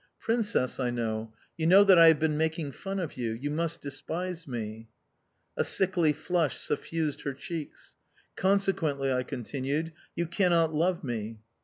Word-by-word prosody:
"Princess," 225 Hz, -, 0 dB
I 125 Hz, -2 st, +1 dB
said, 115 Hz, -2 st, -2 dB, 0.3 s
"you 160 Hz, -1 st, 0 dB
know 195 Hz, +4 st, +8 dB
that 190 Hz, -3 st, +7 dB
I 165 Hz, -, +9 dB
have 160 Hz, -1 st, +7 dB
been 155 Hz, -1 st, +1 dB
making 160 Hz, -1 st, -1 dB
fun 195 Hz, +6 st, -5 dB
of 165 Hz, -7 st, -4 dB
you?... 115 Hz, -3 st, -2 dB
You 140 Hz, +6 st, -4 dB
must 165 Hz, +2 st, -2 dB
despise 165 Hz, +5 st, -5 dB
me." 115 Hz, -3 st, -5 dB, 0.7 s
A -, -, +1 dB
sickly 180 Hz, -5 st, +2 dB
flush 165 Hz, 0 st, 0 dB
suffused 155 Hz, 0 st, -2 dB
her 140 Hz, -2 st, -4 dB
cheeks. 160 Hz, +2 st, -7 dB, 0.4 s
"Consequently," 175 Hz, -9 st, +1 dB
I 125 Hz, -, +1 dB
continued, 140 Hz, +6 st, -3 dB, 0.2 s
"you 170 Hz, -, 0 dB
cannot 170 Hz, -2 st, +2 dB
love 170 Hz, +3 st, +1 dB
me"... 115 Hz, -3 st, -4 dB
160 Hz, 155 wpm, -29 LUFS, 130-175 Hz, 0.7 s, I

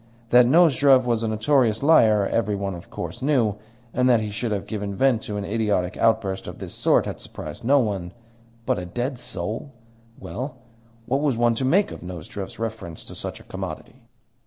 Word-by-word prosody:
That 125 Hz, 0 st, +7 dB
Nozdrev 140 Hz, -4 st, +5 dB
was 120 Hz, -2 st, +1 dB
a 115 Hz, -, -1 dB
notorious 110 Hz, +1 st, +2 dB
liar 110 Hz, -10 st, +5 dB
every 105 Hz, 0 st, 0 dB
one, 100 Hz, -1 st, -3 dB
of 85 Hz, -1 st, -10 dB
course, 85 Hz, +5 st, -6 dB
knew, 125 Hz, -7 st, +2 dB, 0.4 s
and 125 Hz, +1 st, +2 dB
that 120 Hz, -2 st, +5 dB
he 105 Hz, -1 st, -3 dB
should 115 Hz, +2 st, -3 dB
have 100 Hz, -2 st, -2 dB
given 105 Hz, -2 st, -4 dB
vent 130 Hz, -1 st, +3 dB
to 105 Hz, -6 st, -5 dB
an 100 Hz, -, -3 dB
idiotic 105 Hz, -5 st, 0 dB
outburst 110 Hz, -4 st, +1 dB
of -, -, -7 dB
this -, -, -7 dB
sort -, -, +2 dB
had -, -, -5 dB
surprised -, -, -8 dB
no 140 Hz, +5 st, +4 dB
one; 100 Hz, -8 st, -1 dB, 0.5 s
but -, -, +1 dB
a 90 Hz, -, -5 dB
dead 120 Hz, +6 st, -3 dB
soul 115 Hz, +3 st, -5 dB, 0.5 s
well, 130 Hz, +4 st, -6 dB, 0.5 s
what 135 Hz, +4 st, 0 dB
was 140 Hz, -6 st, +1 dB
one 120 Hz, 0 st, +3 dB
to 130 Hz, +3 st, -1 dB
make 195 Hz, +9 st, +3 dB
of -, -, -8 dB
Nozdrev's 90 Hz, +2 st, -7 dB
reference 105 Hz, -7 st, -5 dB
to -, -, -8 dB
such -, -, -6 dB
a -, -, -14 dB
commodity? -, -, -7 dB
115 Hz, 190 wpm, -24 LUFS, 100-130 Hz, 0.5 s, That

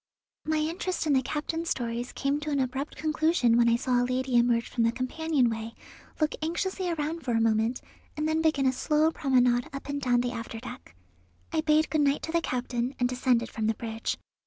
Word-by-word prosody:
My 315 Hz, 0 st, +1 dB
interest 330 Hz, +3 st, -1 dB
in 300 Hz, -, +2 dB
the 265 Hz, -, +4 dB
captain's 320 Hz, +5 st, -3 dB
stories 240 Hz, 0 st, -2 dB
came 280 Hz, +1 st, -1 dB
to 300 Hz, 0 st, -5 dB
an 285 Hz, -2 st, 0 dB
abrupt 265 Hz, +3 st, -2 dB
conclusion 310 Hz, -6 st, +2 dB
when 235 Hz, 0 st, +5 dB
I 230 Hz, -, +4 dB
saw 245 Hz, 0 st, +1 dB
a -, -, +2 dB
lady 260 Hz, 0 st, -1 dB
emerge 235 Hz, -1 st, +3 dB
from 235 Hz, -, -1 dB
the 230 Hz, -, +3 dB
companion 260 Hz, +2 st, 0 dB
way, 225 Hz, 0 st, -4 dB, 0.4 s
look 310 Hz, -1 st, +1 dB
anxiously 365 Hz, +3 st, -2 dB
around 325 Hz, 0 st, -2 dB
for 250 Hz, -5 st, -2 dB
a 225 Hz, -, +3 dB
moment, 225 Hz, +2 st, +1 dB, 0.4 s
and 305 Hz, +1 st, 0 dB
then 315 Hz, 0 st, +1 dB
begin 310 Hz, -4 st, +2 dB
a 260 Hz, -, +3 dB
slow 305 Hz, +4 st, +2 dB
promenade 250 Hz, -5 st, +2 dB
up 275 Hz, 0 st, -7 dB
and 285 Hz, 0 st, -2 dB
down 245 Hz, -2 st, +2 dB
the 245 Hz, 0 st, -2 dB
after 230 Hz, -1 st, -6 dB
deck. 85 Hz, -, -10 dB, 0.6 s
I 315 Hz, -, +2 dB
bade 310 Hz, 0 st, +2 dB
good 310 Hz, -, +2 dB
night 280 Hz, 0 st, +2 dB
to 320 Hz, -, -3 dB
the 335 Hz, 0 st, +2 dB
captain, 250 Hz, -1 st, -2 dB
and 245 Hz, -, +3 dB
descended 245 Hz, -2 st, +1 dB
from 220 Hz, -1 st, -2 dB
the 220 Hz, -, +1 dB
bridge. 225 Hz, 0 st, -3 dB
260 Hz, 210 wpm, -28 LUFS, 240-310 Hz, 0.6 s, when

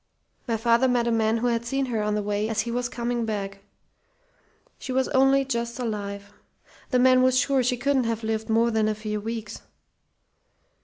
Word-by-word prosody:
My 230 Hz, -2 st, 0 dB
father 235 Hz, +3 st, +3 dB
met 245 Hz, -2 st, +1 dB
a -, -, +1 dB
man 225 Hz, 0 st, +2 dB
who 235 Hz, -, -2 dB
had 235 Hz, -1 st, +1 dB
seen 270 Hz, +3 st, -1 dB
her 230 Hz, -4 st, -2 dB
on 210 Hz, 0 st, 0 dB
the 210 Hz, -, -1 dB
way 205 Hz, +1 st, -1 dB
as 220 Hz, -1 st, 0 dB
he 235 Hz, +2 st, -4 dB
was 245 Hz, +1 st, -2 dB
coming 240 Hz, -1 st, -2 dB
back. 200 Hz, -3 st, -4 dB, 1.2 s
She 260 Hz, -, -6 dB
was 260 Hz, 0 st, +1 dB
only 270 Hz, +1 st, +3 dB
just 235 Hz, -2 st, -3 dB
alive. 205 Hz, -4 st, -5 dB, 0.6 s
The 255 Hz, -, +2 dB
man 255 Hz, 0 st, +5 dB
was 255 Hz, 0 st, +3 dB
sure 270 Hz, 0 st, +2 dB
she 250 Hz, 0 st, 0 dB
couldn't 270 Hz, -1 st, +1 dB
have 230 Hz, 0 st, -2 dB
lived 220 Hz, 0 st, -2 dB
more 230 Hz, +1 st, +3 dB
than 220 Hz, -1 st, +1 dB
a 215 Hz, -, 0 dB
few 210 Hz, -1 st, -4 dB
weeks. 225 Hz, 0 st, -6 dB
235 Hz, 195 wpm, -25 LUFS, 215-250 Hz, 1.2 s, man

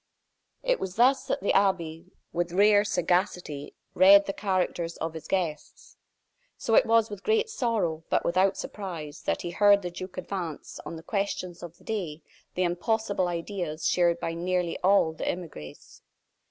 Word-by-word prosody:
It -, -, +1 dB
was 185 Hz, 0 st, -5 dB
thus 260 Hz, +3 st, +3 dB
that -, -, -1 dB
the 200 Hz, -, +1 dB
abbe, 180 Hz, -4 st, +1 dB, 0.3 s
with 175 Hz, 0 st, -1 dB
rare 205 Hz, +2 st, +5 dB
sagacity, 175 Hz, -6 st, -1 dB, 0.2 s
read 200 Hz, +2 st, +7 dB
the 195 Hz, -, -3 dB
character 185 Hz, -4 st, -1 dB
of 165 Hz, 0 st, -3 dB
his 160 Hz, -, -8 dB
guests. 170 Hz, -6 st, -3 dB, 0.6 s
So 225 Hz, -, -2 dB
it -, -, +5 dB
was 225 Hz, -1 st, +3 dB
with 205 Hz, -2 st, -7 dB
great 445 Hz, +1 st, +1 dB
sorrow, 210 Hz, -, -1 dB
but -, -, +1 dB
without 190 Hz, +3 st, +2 dB
surprise, 165 Hz, -7 st, -6 dB
that -, -, -2 dB
he 175 Hz, -, -4 dB
heard 200 Hz, +2 st, +5 dB
the 175 Hz, -, -4 dB
duke 185 Hz, +2 st, -8 dB
advance, 180 Hz, -4 st, -5 dB
on -, -, -6 dB
the 160 Hz, -, -10 dB
questions 195 Hz, -4 st, -3 dB
of 175 Hz, -1 st, -9 dB
the -, -, -22 dB
day, 175 Hz, -8 st, -4 dB, 0.3 s
the 185 Hz, -, +1 dB
impossible 190 Hz, +2 st, 0 dB
ideas 170 Hz, -2 st, -4 dB
shared 170 Hz, -1 st, +3 dB
by 165 Hz, -, -3 dB
nearly 175 Hz, 0 st, -1 dB
all 185 Hz, -4 st, +3 dB
the -, -, -5 dB
emigres. 155 Hz, -, -7 dB
180 Hz, 165 wpm, -27 LUFS, 170-200 Hz, 0.6 s, read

